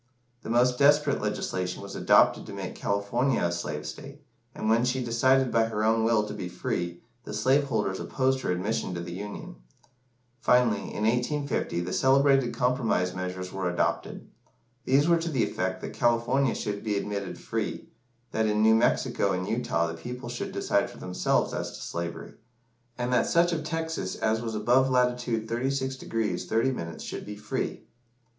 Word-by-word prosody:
The - - -8
most 125 +2 +3
desperate 145 +1 +4
legislation 95 -3 -2
was - - -8
adopted - - +4
to - - -7
make - - -5
California 100 +6 0
a 85 - +1
slave 75 -3 -4
state, 140 - -9 0.3
and - - -3
when 115 +2 +4
she 125 +1 0
decided 130 +2 +3
by 115 -1 +3
her 110 -1 -2
own 110 +1 +3
will 110 -2 +3
to 105 - -6
be 95 -4 -5
free, 85 0 -3 0.2
the 105 - -6
slave 135 +6 +3
holders 105 -7 -1
opposed 130 0 0
her - - -1
admission 90 0 -1
to - - -3
the 85 0 -6
Union. 105 +3 -7 0.8
Finally, 125 0 +2
in 105 - -2
1850, 125 - 0
the 90 +1 -4
celebrated 135 -1 +4
Compromise 120 -8 +1
Measures 90 0 -5
were 95 -2 -1
adopted. 85 - -2 0.6
These 140 +4 +4
were 170 0 +5
to 165 +1 -2
the 130 -7 +1
effect 95 -2 -2
that - - -6
California 120 +2 +2
should 100 -1 -3
be 105 -2 0
admitted 100 -1 -3
free - - -4 0.4
that 110 0 +1
in 105 0 +2
New 110 0 +6
Mexico 115 +2 +2
and - - -2
Utah 85 - 0
the 85 - -3
people 120 +8 -7
should 120 - -4
decide - - +1
for - - -13
themselves 90 0 0
as - - -3
to - - -11
slavery 85 0 -5 0.6
and 125 0 -1
that 125 - +3
such 170 +1 +3
of 160 -2 -2
Texas 160 - -3
as 110 +1 0
was 115 -2 -4
above 125 +5 +3
latitude 125 -3 +1
36° 130 +2 -2 0.4
30´ 110 -8 -1
should - - -6
be 105 - -7
free. 105 +1 -4
115 Hz, 170 wpm, -27 LUFS, 100-130 Hz, 0.8 s, New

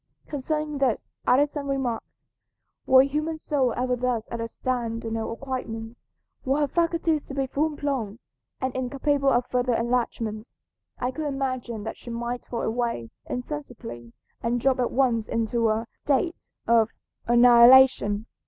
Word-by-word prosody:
Concerning 300 +1 -3
this, 260 -5 0 0.2
Addison 285 +2 +2
remarks, 265 -5 -3 0.6
"Were 260 0 +8
a - - 0
human 305 +3 -2
soul 275 -5 0
ever 250 0 +1
thus 245 -2 -1
at 235 - -3
a 230 - -2
stand 230 -1 -3
in 225 - -3
her 225 0 -2
acquirements, 230 -2 -5 0.4
were 275 +2 +1
her 290 - +2
faculties 335 -1 +1
to 275 - -8
be 270 -1 0
full 290 +4 0
blown 260 -8 -2 0.4
and 260 -1 -2
incapable 275 +2 +1
of 245 -1 +2
further 250 -1 0
enlargement, 230 -2 -2 0.4
I 250 - -1
could 310 +3 -4
imagine 255 -5 -3
that 225 - -5
she - - -11
might 235 +1 -4
fall 235 - -3
away 225 - -2 0.2
insensibly 245 - -6 0.3
and 235 +1 0
drop 260 +1 +2
at 245 - +1
once 240 -4 +1
into 230 0 0
a 220 +1 0
state 295 +5 -1 0.2
of 230 -1 +4 0.4
annihilation. 240 -2 +6
250 Hz, 150 wpm, -25 LUFS, 230-275 Hz, 0.6 s, Were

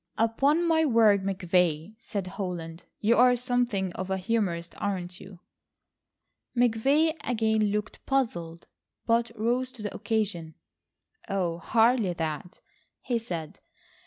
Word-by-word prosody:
"Upon 275 +9 +2
my 320 -1 +3
word, 225 -8 +4
McVay," 180 -2 0
said 200 -5 -4
Holland, 180 -3 -6 0.2
"you 225 +3 +3
are 250 0 +6
something 240 -7 -1
of 185 0 -5
a 190 - 0
humorist, 185 -5 -1
aren't 180 -3 -3
you?" 185 -2 -13 1.2
McVay 270 +7 +3
again 220 -2 +1
looked 210 +1 -3
puzzled, 175 -12 -1 0.4
but 235 0 +2
rose 245 +4 0
to 225 - -10
the 205 - -4
occasion. 190 -8 -2 0.7
"Oh, 175 -4 -1
hardly 225 +1 +3
that," 160 0 -5 0.4
he 240 -2 0
said. 170 -5 -6
210 Hz, 120 wpm, -27 LUFS, 180-235 Hz, 1.2 s, are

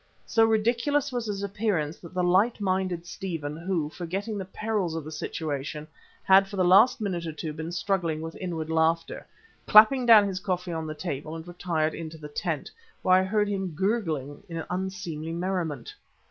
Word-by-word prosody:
So 225 - +3
ridiculous 235 +6 +1
was 240 -2 -3
his 200 -1 -3
appearance 200 -7 -1
that 175 +1 -12
the 180 - +1
light 190 +7 +3
minded 185 -3 -1
Stephen, 165 -6 -5
who, 170 -2 -1
forgetting 195 +5 -4
the 190 - -4
perils 195 -3 -2
of 165 - -3
the 155 - -8
situation, 150 -1 -4 0.4
had 195 +1 +6
for 200 - -8
the 185 -2 +2
last 200 +9 +6
minute 175 -5 -2
or - - -3
two 155 0 -5
been 160 +2 -5
struggling 175 -3 -1
with 165 +1 -6
inward 165 -3 -4
laughter, 160 +1 0 0.4
clapped 240 +4 +7
down 215 -3 +8
his 190 -2 -3
coffee 180 -3 -2
on 160 -1 -3
the 155 - -5
table 155 -1 -5
and 165 +1 -8
retired 170 -3 -1
into 160 -1 -7
the 150 -1 -9
tent, 155 -1 -3 0.3
where 185 - +4
I 185 - +5
heard 210 +2 +1
him 190 -5 -3
gurgling 160 - -1
in 165 -1 -4
unseemly 180 -4 -4
merriment. 170 -7 -3
180 Hz, 180 wpm, -27 LUFS, 160-200 Hz, 0.4 s, down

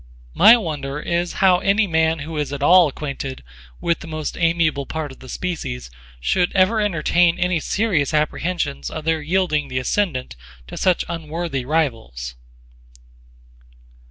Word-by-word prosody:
My 230 - +8
wonder 150 -8 -4
is 170 +2 -1
how 180 -1 +5
any 200 +3 +2
man 160 -2 +1
who 160 0 -7
is 150 -2 -2
at 140 -1 -4
all 175 +2 +7
acquainted 140 - -6 0.4
with 170 -1 0
the - - -10
most 155 -1 -4
amiable 165 -4 +1
part 155 -3 -4
of 130 - -14
the 130 - -12
species 135 - -4 0.3
should 175 - +1
ever 195 +4 +3
entertain 175 -2 +2
any 180 -1 +1
serious 175 - 0
apprehensions 150 - -1
of 155 - -7
their 160 -1 +1
yielding 155 -3 0
the 130 -1 -4
ascendant 130 - -1 0.3
to 65 - -9
such 185 -2 +1
unworthy 160 -4 -4
rivals. 115 - -2
160 Hz, 145 wpm, -21 LUFS, 140-175 Hz, 0.4 s, My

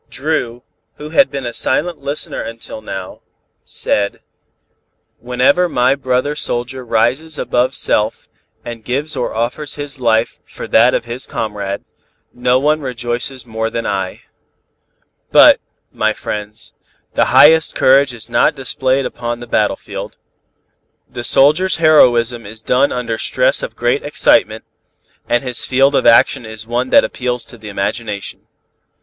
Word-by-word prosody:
Dru, 125 -5 -3 0.3
who 150 - -9
had 275 - +4
been 135 -2 -5
a 120 - -4
silent 160 +7 -1
listener 140 +1 -4
until 115 -1 -8
now, 95 -3 -7 0.4
said: 100 -1 -1 1.0
"Whenever 125 +9 +2
my 125 -2 +2
brother 135 +1 -1
soldier 130 -2 -2
rises 125 +7 0
above 125 +2 0
self 105 +1 0 0.4
and 115 -2 -7
gives 140 +7 -2
or 125 -4 -3
offers 125 +6 -3
his 145 -1 -6
life 115 -2 +1
for - - -9
that - - +4
of - - -2
his 120 +2 -6
comrade, 100 -2 -4 0.5
no 125 +1 +1
one 150 +3 +1
rejoices 125 0 -4
more 110 -1 -3
than 115 0 -4
I. 95 -2 -3 1.1
But, - - +7 0.3
my 110 0 0
friends, 105 +1 -6 0.4
the - - +2
highest 160 +1 +5
courage 135 +1 +4
is 115 -2 -9
not 120 +4 +2
displayed 130 0 -1
upon 120 -1 -4
the 120 - -8
battlefield. 115 - -2 0.9
The 120 - -7
soldier's 155 +10 +4
heroism 120 -7 +4
is 110 +1 -11
done 135 +3 +2
under 115 -2 -3
stress - - +1
of - - -6
great 440 +1 0
excitement, - - +2 0.7
and 120 +2 +1
his 125 -3 -1
field 135 +2 +2
of 135 - +2
action 115 +1 +4
is 110 0 -8
one 120 +2 -2
that - - +6
appeals 125 -1 -3
to 120 - -13
the 105 -1 -9
imagination. 100 +1 -4
125 Hz, 140 wpm, -16 LUFS, 115-140 Hz, 1.1 s, But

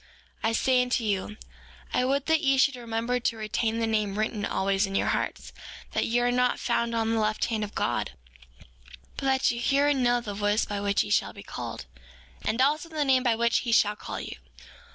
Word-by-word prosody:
5:12 225 - +3
I - - 0
say 255 +2 +3
unto 250 -1 0
you, 210 0 -2 0.6
I 250 - +2
would 275 +1 0
that 320 0 +2
ye 270 -3 +3
should 275 0 +3
remember 235 +1 -2
to 235 -1 -1
retain 220 +1 -1
the 230 - 0
name 215 -2 0
written 215 -1 -1
always 195 +1 +1
in 195 - -5
your - - +1
hearts, - - -3 0.4
that - - 0
ye 235 - +1
are 245 0 +2
not 250 0 +2
found 235 -1 0
on 225 0 0
the 225 - +1
left 215 0 0
hand 220 -2 -2
of 205 - -7
God, - - -1 1.0
but - - -5
that 265 0 +3
ye 235 - -4
hear 280 +4 +2
and 285 -3 +2
know 245 0 +3
the 215 -4 -6
voice 205 +2 +1
by 205 -1 -4
which 200 0 +2
ye 205 - -7
shall - - +1
be - - -11
called, - - -6 0.6
and 230 +4 +1
also, 300 +4 +1
the 310 -2 -1
name 260 -1 +4
by 240 -3 +2
which 235 +1 +2
he 240 - -3
shall 210 -2 +4
call - - -6
you. - - -7
235 Hz, 220 wpm, -27 LUFS, 215-255 Hz, 1.0 s, name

